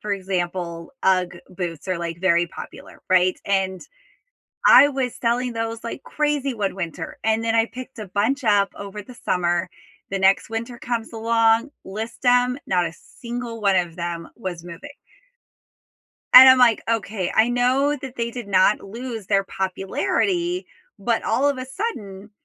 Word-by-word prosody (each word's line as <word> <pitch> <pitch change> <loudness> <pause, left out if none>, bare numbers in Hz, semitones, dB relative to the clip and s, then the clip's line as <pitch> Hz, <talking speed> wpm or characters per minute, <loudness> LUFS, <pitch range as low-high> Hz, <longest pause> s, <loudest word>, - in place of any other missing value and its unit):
for 210 - -3
example, 180 -2 -3
UGG 180 -2 +1
boots 175 -2 -6
are 185 -2 -1
like 170 0 -5
very 175 -2 +3
popular, - - -11
right? 185 0 +3
And 190 -2 0 0.9
I 285 - +8
was 265 -3 -2
selling 240 +1 0
those 225 0 -4
like 235 +3 -6
crazy 295 -3 -1
one 205 -5 -2
winter, 170 -4 -6
and 220 0 +1
then 225 0 0
I 225 0 +4
picked 255 +2 -10
a 210 - -6
bunch 260 +8 0
up 205 -3 +3
over 200 +1 -7
the 250 +4 -13
summer, 175 0 +1 0.4
the 195 - -1
next 190 +3 +3
winter 230 +2 -5
comes 235 -2 -4
along, 230 +2 +2 0.2
list 220 +7 -7
'em, 245 +1 +3
not 180 -2 +2
a 165 - -5
single 235 +3 -8
one 200 -2 +3
of 175 -3 0
them 170 -1 -5
was 185 -7 -6
moving 175 +11 -10 1.4
and 260 +1 +12
I'm 260 0 +8
like, 245 -3 +4
"Okay, 210 -4 -1
I 220 +2 +4
know 255 +4 +2
that 265 -2 -8
they 235 0 -2
did 240 -2 -7
not 195 +1 +3
lose 230 0 -7
their 195 -1 +2
popularity, 345 - -1 0.3
but - - -1
all 285 - +2
of 280 -2 -1
a 255 - -5
sudden, 215 - -6
220 Hz, 165 wpm, -22 LUFS, 185-245 Hz, 1.4 s, and